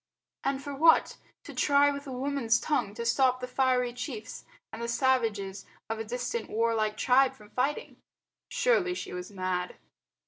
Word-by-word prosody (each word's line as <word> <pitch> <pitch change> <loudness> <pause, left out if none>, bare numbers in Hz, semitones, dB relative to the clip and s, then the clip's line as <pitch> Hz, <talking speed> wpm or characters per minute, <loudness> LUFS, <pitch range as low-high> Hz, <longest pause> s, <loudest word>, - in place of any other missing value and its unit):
And 275 0 -1
for 285 - -5
what? 320 +4 +4 0.3
To - - -10
try 285 0 +4
with 280 0 -6
a - - -6
woman's 255 -3 +1
tongue 210 -9 -1
to 235 - -4
stop 255 +1 +3
the 250 - -5
fiery 250 -1 +1
chiefs 235 -3 -7 0.3
and 225 - -6
the 235 - -2
savages 225 -6 0 0.2
of 225 - -3
a - - -2
distant 245 - -4
warlike 220 -1 0
tribe 260 +1 +4
from 210 -1 -17
fighting. 275 +4 -2 0.5
Surely 375 -8 +2
she - - -6
was 180 0 -6
mad. 185 -2 -3
250 Hz, 165 wpm, -29 LUFS, 220-275 Hz, 0.5 s, what